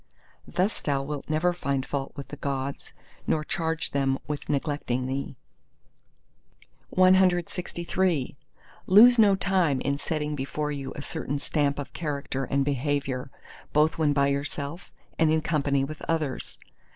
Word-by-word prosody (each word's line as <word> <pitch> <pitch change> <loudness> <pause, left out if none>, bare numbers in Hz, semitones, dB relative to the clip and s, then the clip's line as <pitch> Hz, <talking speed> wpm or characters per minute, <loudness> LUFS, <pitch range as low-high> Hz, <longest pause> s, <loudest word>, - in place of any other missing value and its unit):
Thus 190 +4 0
thou 140 -2 0
wilt 145 0 -5
never 155 +3 +2
find 140 -6 -2
fault 135 -1 -3
with 140 -2 -8
the - - -6
Gods, 140 -1 -4 0.4
nor 155 - +1
charge 165 +1 -2
them 135 -1 +1
with 150 -1 -5
neglecting 140 -3 -1
thee. 135 +1 -3 1.6
CLXIV 180 -4 +2 0.5
Lose 230 +5 +8
no 205 -3 +6
time 180 -7 +1
in 140 0 -1
setting 150 -1 -2
before 150 +2 -3
you 135 -2 -5
a 145 - -6
certain 145 -3 -3
stamp 145 0 0
of 145 - -6
character 140 -4 -3
and 140 +1 +1
behaviour 140 -1 -1 0.4
both 155 +2 +3
when 155 -2 +3
by 140 -1 +3
yourself 145 +4 -3 0.3
and 160 -1 +4
in 160 0 +2
company 140 -4 +1
with 150 +2 -6
others. 155 -5 -2
145 Hz, 140 wpm, -27 LUFS, 140-165 Hz, 1.6 s, Lose